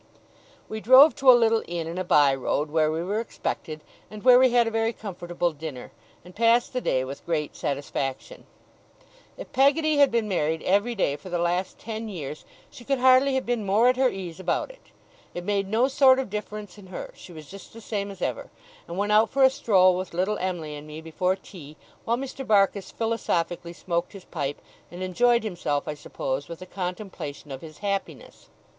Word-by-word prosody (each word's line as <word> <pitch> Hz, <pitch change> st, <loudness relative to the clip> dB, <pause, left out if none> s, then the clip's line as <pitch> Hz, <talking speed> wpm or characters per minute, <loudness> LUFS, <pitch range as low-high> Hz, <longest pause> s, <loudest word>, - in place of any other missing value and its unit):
We 220 Hz, -, -5 dB
drove 260 Hz, +7 st, +7 dB
to 270 Hz, -1 st, +4 dB
a -, -, +11 dB
little 225 Hz, -1 st, +3 dB
inn 170 Hz, -1 st, -3 dB
in 170 Hz, +3 st, -5 dB
a -, -, -1 dB
by 145 Hz, -5 st, +4 dB
road, 145 Hz, +3 st, -2 dB
where 155 Hz, -1 st, +2 dB
we 160 Hz, +2 st, -2 dB
were 205 Hz, +4 st, -1 dB
expected, 155 Hz, -8 st, -5 dB, 0.3 s
and 215 Hz, -1 st, -10 dB
where 250 Hz, 0 st, +8 dB
we 260 Hz, 0 st, +5 dB
had 240 Hz, -1 st, +4 dB
a 225 Hz, -, -2 dB
very 225 Hz, +1 st, 0 dB
comfortable 175 Hz, -4 st, -3 dB
dinner, 150 Hz, -4 st, -8 dB, 0.3 s
and 180 Hz, -, -14 dB
passed 230 Hz, +3 st, +3 dB
the 250 Hz, -, -1 dB
day 130 Hz, -, 0 dB
with 135 Hz, +2 st, -8 dB
great 155 Hz, -3 st, -2 dB
satisfaction. 140 Hz, -1 st, -4 dB, 0.9 s
If -, -, -9 dB
Peggotty 295 Hz, +3 st, +3 dB
had 285 Hz, -1 st, +6 dB
been 230 Hz, -2 st, 0 dB
married 160 Hz, -4 st, -1 dB
every 205 Hz, +6 st, +1 dB
day 145 Hz, -8 st, 0 dB
for 185 Hz, -, -11 dB
the 175 Hz, -, -1 dB
last 175 Hz, +2 st, -1 dB
ten 220 Hz, 0 st, -6 dB
years, 155 Hz, -6 st, -7 dB, 0.3 s
she 240 Hz, -, -12 dB
could 275 Hz, +3 st, 0 dB
hardly 260 Hz, +1 st, +5 dB
have 265 Hz, -, -1 dB
been 240 Hz, -2 st, -1 dB
more 210 Hz, +5 st, +4 dB
at 255 Hz, -, +1 dB
her 260 Hz, -1 st, +4 dB
ease 185 Hz, -4 st, -7 dB
about 185 Hz, -, -1 dB
it; -, -, -21 dB, 0.5 s
it 175 Hz, -, -4 dB
made 200 Hz, 0 st, -1 dB
no 230 Hz, +5 st, +3 dB
sort 265 Hz, -1 st, +5 dB
of 265 Hz, -6 st, -3 dB
difference 210 Hz, -1 st, -6 dB
in 190 Hz, -, -13 dB
her: 185 Hz, -, -7 dB
she 185 Hz, -, -13 dB
was 155 Hz, -3 st, -11 dB
just 195 Hz, +4 st, -12 dB
the 230 Hz, -, -12 dB
same 205 Hz, -2 st, -4 dB
as 195 Hz, -2 st, -8 dB
ever, -, -, -3 dB, 0.4 s
and 170 Hz, -, -7 dB
went 205 Hz, +1 st, 0 dB
out 215 Hz, +1 st, +5 dB
for 275 Hz, 0 st, +2 dB
a 265 Hz, -, +7 dB
stroll 190 Hz, -9 st, +4 dB
with 185 Hz, -2 st, -5 dB
little 190 Hz, +4 st, 0 dB
Em'ly 175 Hz, -5 st, -3 dB
and 145 Hz, +1 st, -10 dB
me 155 Hz, +1 st, -8 dB
before 180 Hz, +3 st, -1 dB
tea, 155 Hz, -6 st, -13 dB, 0.3 s
while 235 Hz, +1 st, +1 dB
Mr. 270 Hz, +1 st, -6 dB
Barkis 200 Hz, -4 st, +2 dB
philosophically 175 Hz, -7 st, -2 dB
smoked 170 Hz, -1 st, -3 dB
his 195 Hz, -2 st, -11 dB
pipe, 140 Hz, +1 st, -4 dB, 0.3 s
and 175 Hz, +1 st, -7 dB
enjoyed 235 Hz, +6 st, +2 dB
himself, 175 Hz, -8 st, -2 dB
I -, -, -2 dB
suppose, 140 Hz, -1 st, -4 dB
with 170 Hz, -, -7 dB
the 185 Hz, -, -10 dB
contemplation 180 Hz, -6 st, -6 dB
of 135 Hz, -, -7 dB
his 155 Hz, -2 st, -11 dB
happiness. 200 Hz, -1 st, -4 dB
190 Hz, 205 wpm, -25 LUFS, 165-230 Hz, 0.9 s, a